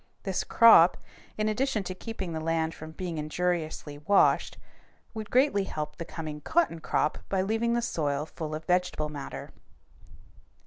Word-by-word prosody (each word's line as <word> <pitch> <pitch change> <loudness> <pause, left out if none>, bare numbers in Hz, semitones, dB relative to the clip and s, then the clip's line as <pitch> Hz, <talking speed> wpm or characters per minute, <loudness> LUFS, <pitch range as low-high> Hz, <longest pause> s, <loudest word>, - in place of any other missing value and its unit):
This 190 -2 -1
crop, 220 -7 +7 0.4
in 215 0 0
addition 220 0 0
to 185 - -4
keeping 190 -3 -6
the 160 - -2
land 160 0 0
from 155 - -9
being 165 0 -5
injuriously 155 -2 -2
washed, 195 +7 +3 0.6
would 220 -1 -6
greatly 250 -7 +3
help 150 -4 -5
the 170 - -5
coming 155 -3 -6
cotton 320 - +1
crop 155 -1 0
by 190 -1 +1
leaving 225 +3 0
the 240 - 0
soil 150 -9 -1
full 155 -1 -6
of 155 +1 -7
vegetable 180 -4 0
matter. 145 -2 -7
175 Hz, 150 wpm, -28 LUFS, 155-215 Hz, 0.6 s, crop